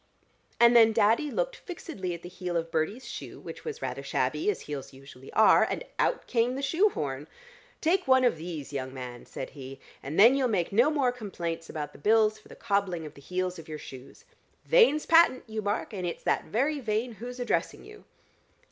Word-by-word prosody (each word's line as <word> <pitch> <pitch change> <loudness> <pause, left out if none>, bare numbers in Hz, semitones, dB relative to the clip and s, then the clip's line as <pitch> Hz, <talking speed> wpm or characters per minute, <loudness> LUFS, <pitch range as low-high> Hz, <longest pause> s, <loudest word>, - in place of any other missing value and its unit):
And 235 0 +6
then 225 -1 +7
Daddy 225 +7 +3
looked - - -2
fixedly 295 - -6
at 170 - -12
the - - -7
heel 180 -1 -4
of 165 0 -3
Bertie's 180 +11 -2
shoe - - -8
which - - -9
was 460 0 -6
rather - - -3
shabby, 380 - -1
as 420 - -1
heels 145 -3 -7
usually 135 0 -13
are, 220 - +6
and - - -2 0.2
out - - +1
came 240 +1 +1
the 275 - -4
shoe 335 +10 +3
horn. 145 - -4 0.5
'Take 360 +2 +1
one 260 0 +5
of 245 - +3
these, 155 -3 -7
young 130 -1 -4
man,' 125 -2 -8
said 130 - -7
he, 135 -1 -10 0.2
'and 145 +6 -4
then 230 +5 +8
you'll 270 -2 +2
make 190 -7 0
no 240 +8 +5
more 280 -5 +1
complaints 170 -8 -5
about 150 -2 -5
the - - -14
bills 215 +4 +3
for - - -20
the - - -12
cobbling 200 -6 -1
of 150 - -9
the 140 - -15
heels 180 +3 -3
of 165 - -11
your 155 - -5
shoes. 130 -3 -12 0.4
Vane's 460 - +4
patent, 330 -6 +5
you 220 -1 -4
mark, 205 +1 -2
and 185 -3 -3
it's 170 - -5
that - - 0
very 285 +6 0
Vane 225 0 -1
who's 245 +1 -7
addressing 245 - -1
you!'" 430 - -14
215 Hz, 205 wpm, -28 LUFS, 165-260 Hz, 0.5 s, then